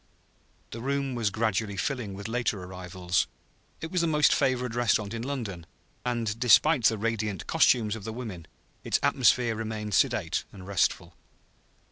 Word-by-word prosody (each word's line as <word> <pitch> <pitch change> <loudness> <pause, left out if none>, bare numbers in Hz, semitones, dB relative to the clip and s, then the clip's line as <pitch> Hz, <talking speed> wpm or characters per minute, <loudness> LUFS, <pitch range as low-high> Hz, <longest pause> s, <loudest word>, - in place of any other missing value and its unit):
The 115 - -6
room 140 +1 -1
was 115 -4 0
gradually 110 -1 -1
filling 110 -1 -2
with 100 +2 -6
later 115 -4 -1
arrivals; 90 0 -2 0.5
it 160 - -5
was 180 -2 +1
the 170 - +1
most 150 -2 +4
favored 125 -2 0
restaurant 115 -3 +1
in 115 - -4
London, 115 -11 -5 0.4
and, 115 -3 -2
despite 125 +2 +5
the 110 - +4
radiant 110 -3 -2
costumes 110 -3 +3
of 110 - -8
the 110 - -5
women, 105 -9 -7 0.4
its - - +1
atmosphere 120 -3 +3
remained 110 -1 -4
sedate - - +1
and 95 -2 -11
restful. 95 -3 0
110 Hz, 150 wpm, -28 LUFS, 100-125 Hz, 0.5 s, despite